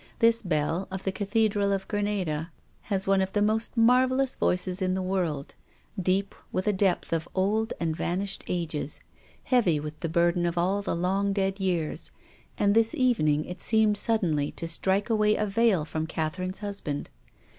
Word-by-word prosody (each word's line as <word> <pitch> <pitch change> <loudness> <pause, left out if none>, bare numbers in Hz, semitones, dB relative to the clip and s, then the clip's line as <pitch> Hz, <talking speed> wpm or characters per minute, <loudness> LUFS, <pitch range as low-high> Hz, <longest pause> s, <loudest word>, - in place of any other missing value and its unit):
This 230 0 +4
bell 165 0 -1
of 190 0 -5
the 190 - 0
Cathedral 205 0 +1
of 195 -1 -2
Granada 190 -6 -2 0.4
has 195 -2 0
one 195 0 +3
of 190 0 -2
the 205 - +1
most 220 +3 0
marvellous 255 +3 +3
voices 180 +1 +1
in 185 0 +1
the 190 - -1
world, 175 -7 -2 0.5
deep 190 +2 +1 0.2
with 185 - -1
a 210 - +2
depth 190 -3 +1
of 165 0 -2
old 210 +4 +1
and 160 -2 -1
van 175 +2 -1
ished 200 0 -1
ages, 160 -4 -2 0.4
heavy 200 - +2
with 150 +1 -7
the 165 - -3
burden 175 +1 +2
of 170 0 -3
all 190 +4 +1
the 200 - -2
long 195 +3 0
dead 195 0 -1
years, 175 -5 -1 0.5
and 200 0 +3
this 225 +1 +3
evening 155 - +2
it 180 0 -8
seemed 220 -2 +3
sud 225 +2 +1
denly 150 -4 0
to 165 - -4
strike 190 +6 0
away 215 -1 +3
a 210 - 0
veil 200 -5 +2
from 160 0 -3
Catherine's 185 +4 -2
husband. 175 -8 -4
190 Hz, 175 wpm, -27 LUFS, 170-210 Hz, 0.5 s, This